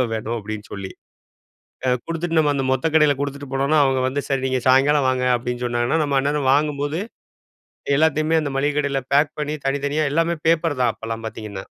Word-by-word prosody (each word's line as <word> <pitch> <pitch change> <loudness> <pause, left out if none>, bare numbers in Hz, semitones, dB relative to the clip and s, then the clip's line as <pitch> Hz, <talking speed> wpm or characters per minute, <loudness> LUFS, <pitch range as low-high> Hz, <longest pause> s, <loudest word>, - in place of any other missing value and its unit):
எவ்வளோ - - +3
வேணும்?" 110 +1 -3
அப்படீன்னு 110 0 -6
சொல்லி. 100 -2 -6 1.0
அ - - +2 0.2
குடுத்துட்டு 165 0 -2
நம்ம 150 -2 +3
அந்த 135 - -1
மொத்த 130 +2 0
கடையில 150 -2 +5
குடுத்துட்டு 140 -1 -5
போனோம்ன்னா, 140 +3 +2
அவங்க 135 -1 +1
வந்து 140 +2 -2
"சரி. 135 -1 0
நீங்க 130 -1 -1
சாயங்காலம் 135 +2 +4
வாங்க" 130 -1 0
அப்படீன்னு 125 +1 -4
சொன்னாங்கன்னா, 120 +5 0
நம்ம 140 -2 0
அந்நேரம் 145 -1 0
வாங்கும்போது 145 +1 0 1.0
எல்லாத்தையுமே 155 +2 +2
அந்த 150 - -3
மளிகை 145 +2 +1
கடையில 140 -2 0
பேக் 145 +2 +3
பண்ணி, 150 0 -2
தனித்தனியா 145 +2 0
எல்லாமே 165 +3 +1
பேப்பர் 165 -4 +1
தான் 120 -2 +3
அப்பல்லாம் 115 0 -6
பார்த்தீங்கன்னா. 105 -3 -7
140 Hz, 180 wpm, -21 LUFS, 130-150 Hz, 1.0 s, கடையில